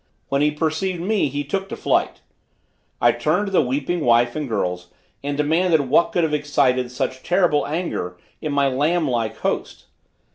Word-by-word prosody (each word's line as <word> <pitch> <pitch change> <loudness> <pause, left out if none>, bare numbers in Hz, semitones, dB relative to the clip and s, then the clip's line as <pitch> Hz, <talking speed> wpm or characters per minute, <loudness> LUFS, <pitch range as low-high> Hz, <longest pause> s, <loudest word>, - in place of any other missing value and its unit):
When 140 +1 +1
he 150 - +4
perceived 160 +4 -1
me 200 0 +1
he 145 +2 -3
took 195 +7 -3
to - - -4
flight. - - 0 0.8
I - - +5
turned 205 - 0
to 195 - -5
the 190 - +4
weeping 145 +7 -1
wife 120 -4 +3
and 150 -4 -3
girls 90 -4 -2 0.4
and 140 0 -2
demanded 160 +2 +2
what 170 - +4
could 175 - +1
have 155 -2 0
excited 140 -4 +1
such 130 +1 -3
terrible 175 -5 +2
anger 145 - -3 0.2
in 155 - -3
my 140 -1 +2
lamb 150 +5 +1
like 115 -3 -1
host. - - -3
145 Hz, 175 wpm, -22 LUFS, 130-170 Hz, 0.8 s, I